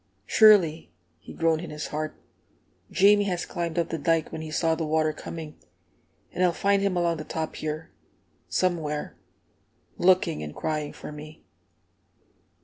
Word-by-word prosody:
"Surely," 180 Hz, -, +5 dB, 0.3 s
he -, -, -12 dB
groaned 165 Hz, -1 st, +1 dB
in 175 Hz, -, -7 dB
his 150 Hz, 0 st, -5 dB
heart, 155 Hz, 0 st, -4 dB, 0.7 s
"Jamie 205 Hz, +1 st, +5 dB
has 180 Hz, -3 st, -2 dB
climbed 170 Hz, -2 st, -4 dB
up 170 Hz, -, +1 dB
the 165 Hz, -, -3 dB
dike 165 Hz, +2 st, +1 dB
when 160 Hz, -, -5 dB
he 160 Hz, -, -6 dB
saw 160 Hz, +1 st, +1 dB
the 160 Hz, 0 st, -2 dB
water 155 Hz, 0 st, +1 dB
coming, 155 Hz, 0 st, -8 dB, 0.8 s
and 180 Hz, -, -1 dB
I'll 180 Hz, -1 st, +3 dB
find 200 Hz, +2 st, +2 dB
him 195 Hz, -2 st, 0 dB
along 170 Hz, -1 st, +1 dB
the 155 Hz, -, -5 dB
top 160 Hz, 0 st, -4 dB
here, 155 Hz, +1 st, -5 dB, 0.6 s
somewhere, 160 Hz, -5 st, -1 dB, 0.8 s
looking 180 Hz, -, +3 dB
and 75 Hz, 0 st, -7 dB
crying 155 Hz, -2 st, -2 dB
for -, -, -9 dB
me!" 150 Hz, +1 st, -11 dB
160 Hz, 150 wpm, -26 LUFS, 155-175 Hz, 0.8 s, Surely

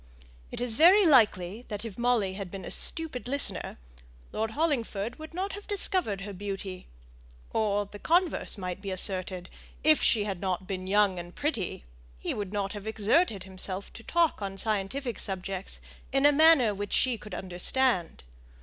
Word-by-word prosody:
It -, -, -6 dB
is 245 Hz, -2 st, +1 dB
very 365 Hz, -, +6 dB
likely 220 Hz, -, +3 dB
that 210 Hz, 0 st, -5 dB
if 215 Hz, -4 st, -7 dB
Molly 235 Hz, -5 st, +1 dB
had 195 Hz, -1 st, -6 dB
been 195 Hz, +1 st, -8 dB
a -, -, -6 dB
stupid 315 Hz, -7 st, +1 dB
listener, 280 Hz, +2 st, -1 dB, 0.5 s
Lord 220 Hz, +1 st, -2 dB
Hollingford 240 Hz, -7 st, -1 dB
would 315 Hz, 0 st, -9 dB
not 375 Hz, +4 st, -3 dB
have 410 Hz, +1 st, -9 dB
discovered 370 Hz, -, 0 dB
her 200 Hz, 0 st, -6 dB
beauty; 195 Hz, -1 st, -6 dB, 0.7 s
or 205 Hz, -2 st, +1 dB
the 205 Hz, +1 st, -12 dB
converse 345 Hz, -, +1 dB
might 185 Hz, -1 st, -5 dB
be 200 Hz, -, -5 dB
asserted 185 Hz, -1 st, -1 dB, 0.4 s
if 310 Hz, +1 st, +5 dB
she 215 Hz, -3 st, +4 dB
had 195 Hz, -4 st, -4 dB
not 185 Hz, -1 st, -2 dB
been 185 Hz, -1 st, -5 dB
young 200 Hz, -2 st, +3 dB
and 175 Hz, +1 st, -9 dB
pretty, 260 Hz, -, -3 dB, 0.3 s
he -, -, -3 dB
would 200 Hz, -2 st, -4 dB
not 200 Hz, -1 st, -2 dB
have 205 Hz, 0 st, -8 dB
exerted 220 Hz, -, +1 dB
himself 190 Hz, +1 st, -5 dB
to -, -, -11 dB
talk 335 Hz, 0 st, +1 dB
on 195 Hz, -1 st, -4 dB
scientific 220 Hz, +4 st, -2 dB
subjects 190 Hz, 0 st, -4 dB, 0.3 s
in 270 Hz, +1 st, +2 dB
a 290 Hz, -, +8 dB
manner 290 Hz, -7 st, +5 dB
which 205 Hz, 0 st, -5 dB
she 255 Hz, -2 st, +3 dB
could 210 Hz, -4 st, -8 dB
understand. 185 Hz, -, +1 dB
205 Hz, 170 wpm, -28 LUFS, 190-265 Hz, 0.7 s, a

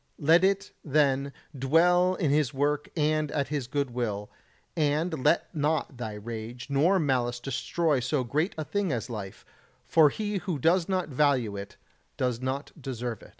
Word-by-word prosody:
Let 165 Hz, +4 st, +4 dB
it, 195 Hz, +1 st, +1 dB
then, 140 Hz, -2 st, +2 dB, 0.2 s
dwell 175 Hz, +7 st, +3 dB
in 160 Hz, -7 st, 0 dB
His 145 Hz, -2 st, +1 dB
work 145 Hz, +1 st, 0 dB
and 155 Hz, 0 st, +1 dB
at 140 Hz, -3 st, -1 dB
His 140 Hz, -4 st, -2 dB
good 140 Hz, -1 st, -1 dB
will, 105 Hz, -4 st, -3 dB, 0.4 s
and 155 Hz, -1 st, 0 dB
let 150 Hz, +3 st, +2 dB
not 150 Hz, -3 st, 0 dB
thy 110 Hz, -3 st, -4 dB
rage 115 Hz, +3 st, -7 dB
or 170 Hz, +8 st, +4 dB
malice 125 Hz, -6 st, 0 dB
destroy 140 Hz, +4 st, 0 dB
so 130 Hz, +2 st, 0 dB
great 150 Hz, -, -1 dB
a 155 Hz, -, -3 dB
thing 200 Hz, -1 st, -1 dB
as 120 Hz, -1 st, -3 dB
life, 100 Hz, -4 st, -7 dB, 0.4 s
for 160 Hz, -3 st, +5 dB
he 210 Hz, +4 st, -3 dB
who 180 Hz, -4 st, -3 dB
does 165 Hz, +6 st, +2 dB
not 185 Hz, -3 st, 0 dB
value 130 Hz, -6 st, +1 dB
it 100 Hz, 0 st, -8 dB, 0.4 s
does 125 Hz, -2 st, -1 dB
not 130 Hz, +2 st, -3 dB
deserve 120 Hz, -4 st, -4 dB
it. -, -, -14 dB
145 Hz, 165 wpm, -28 LUFS, 125-160 Hz, 0.4 s, for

